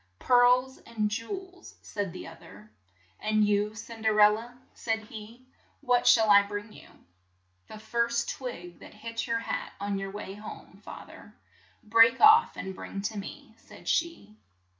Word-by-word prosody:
"Pearls 250 - +3
and 215 -2 -3
jew 230 +1 -4
els," 375 -1 -8
said 200 -3 -4
the 185 - -9
oth 165 0 -13
er. 105 +3 -15 0.5
"And 215 0 +2
you, 205 +1 0
Cin 225 +1 -10
.der 220 -1 +2
el 210 0 +7
la, 230 +3 -6
" - - -36
said 225 -1 0
he, 220 +3 -12 0.4
"what 245 -1 +2
shall 220 -2 +6
I 200 0 +8
bring 205 +1 -7
you?" - - -14 0.8
"The - - -10
first 235 +2 -1
twig 180 -10 -7
that - - -14
hits 230 +2 -5
your 230 0 0
hat - - -4
on 200 0 -2
your 195 0 -5
way 195 -1 -7
home, 210 +1 -11
fa - - -9
ther, - - -15 0.5
break 230 +2 +5
off 440 +2 +6
and 190 - -5
bring 195 +1 -7
to 215 +1 -3
me," 200 - -10
said - - -16
she. 325 -11 -2
220 Hz, 175 wpm, -28 LUFS, 205-235 Hz, 0.8 s, I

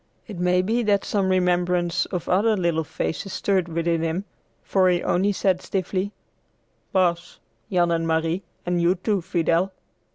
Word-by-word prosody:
It 205 -6 -8
may 180 +1 +2
be 225 +5 +1
that 205 -3 +1
some 195 -2 0
remembrance 180 -1 +1
of 180 -3 -4
other 210 +4 +3
little 170 -3 +1
faces 165 +5 -4
stirred 190 -3 +1
within 165 0 0
him, 165 +4 -2 0.4
for 185 -2 +3
he 175 -1 +1
only 195 +4 +2
said 190 -2 +1
stiffly, 190 +1 -2 0.8
"Pass, 175 -2 0 0.3
Jan 175 -2 +2
and 165 0 0
Marie, 165 +2 0 0.2
and 175 -1 0
you, 175 +2 +3
too, 195 +1 -1
Fidel." 170 +1 +1
180 Hz, 155 wpm, -24 LUFS, 170-190 Hz, 0.8 s, other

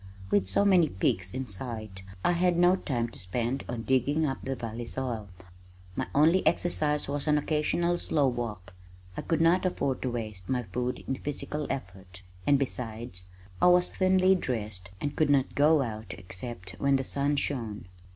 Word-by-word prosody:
With 100 -2 +3
so 95 - +3
many 180 -6 +5
peaks 95 -2 0
in 130 0 -4
sight, 110 -2 -4 0.2
I - - +5
had 175 0 +2
no 175 +1 +5
time 120 -10 -2
to - - -8
spend 120 +8 -2
on 120 -2 -3
digging 135 +5 +2
up 135 -2 -2
the 135 0 -3
valley 115 -1 -5
soil. 120 -6 -3 0.7
My - - -2
only 165 +6 +5
exercise 150 -4 +1
was 145 +1 -3
an 150 0 +4
occasional 165 +4 +1
slow 145 -3 +2
walk. 110 -7 -4 0.4
I - - -3
could 165 -1 0
not 170 +3 +4
afford 155 -8 -1
to 130 - -1
waste 110 -6 -5
my 125 -2 0
food 125 +5 -3
in 135 - -1
physical 150 +1 -4
effort, 95 -5 -6 0.2
and 145 - +6
besides 115 -8 -4 0.4
I - - +6
was 180 0 +5
thinly 185 0 +4
dressed 105 - -3
and 145 +5 -3
could 155 -2 +2
not 140 -2 +3
go 150 0 +4
out 110 -2 -6
except 95 +1 -7
when 140 0 +3
the 135 - +1
sun 140 +2 0
shone. 115 -9 -2
130 Hz, 175 wpm, -29 LUFS, 110-150 Hz, 0.7 s, and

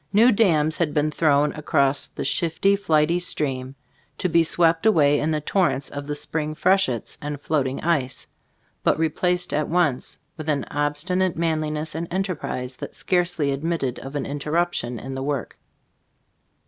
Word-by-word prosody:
New 230 +5 +6
dams 160 -8 +2
had 165 -3 -1
been 150 +1 +2
thrown 150 -2 +2
across 140 -2 +1
the 140 - -6
shifty, 170 +7 +2
flighty 165 -3 +2
stream, 135 -6 -2 0.4
to 185 - 0
be 170 -1 +4
swept 165 0 +2
away 145 -9 +4
in 155 - 0
the 155 -1 0
tor 185 +4 +2
rents 135 - -3
of 145 0 -6
the 145 - -2
spring 155 +1 -2
freshets 175 - +1
and 145 -1 -4
float 145 -2 0
ing 130 - -4
ice, 145 -6 -1 0.6
but - - +2
replaced 180 +3 0
at 150 0 0
once 160 -7 0 0.2
with 155 -1 -5
an 145 -2 0
obstinate 165 +5 0
manliness 155 -2 -1
and 165 +1 -4
enterprise 170 -9 -3
that - - -8
scarcely 175 -5 0
admitted 140 -3 -2
of 135 +2 -8
an 140 - -2
interrup 155 +5 -1
tion 120 0 -3
in 130 +4 -7
the 130 - -4
work. 140 -3 -3
155 Hz, 165 wpm, -23 LUFS, 145-170 Hz, 0.6 s, New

